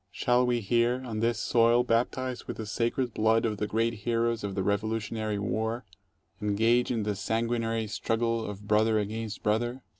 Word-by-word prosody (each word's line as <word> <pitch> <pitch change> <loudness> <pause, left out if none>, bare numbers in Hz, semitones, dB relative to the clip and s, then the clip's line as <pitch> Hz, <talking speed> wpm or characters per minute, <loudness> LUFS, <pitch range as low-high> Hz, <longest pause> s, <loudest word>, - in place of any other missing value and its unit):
Shall 125 +1 +2
we 120 -1 +1
here, 120 +4 +1
on 110 -3 -4
this 115 0 +1
soil 120 0 +4
baptized 125 +2 -1
with - - -6
the 110 - -5
sacred 120 +2 -1
blood 110 +1 +2
of 110 -2 -1
the 105 - -2
great 115 +2 0
heroes 115 0 0
of 100 -1 -3
the 95 - 0
Revolutionary 110 +1 -1
War, 110 +4 -2 0.6
engage 115 +4 +2
in 115 -3 0
the 105 0 -1
sanguinary 115 +2 -1
struggle 115 +2 -1
of 105 -1 -7
brother 110 +1 +3
against 110 +1 -3
brother? 120 +4 0
115 Hz, 170 wpm, -28 LUFS, 105-120 Hz, 0.6 s, soil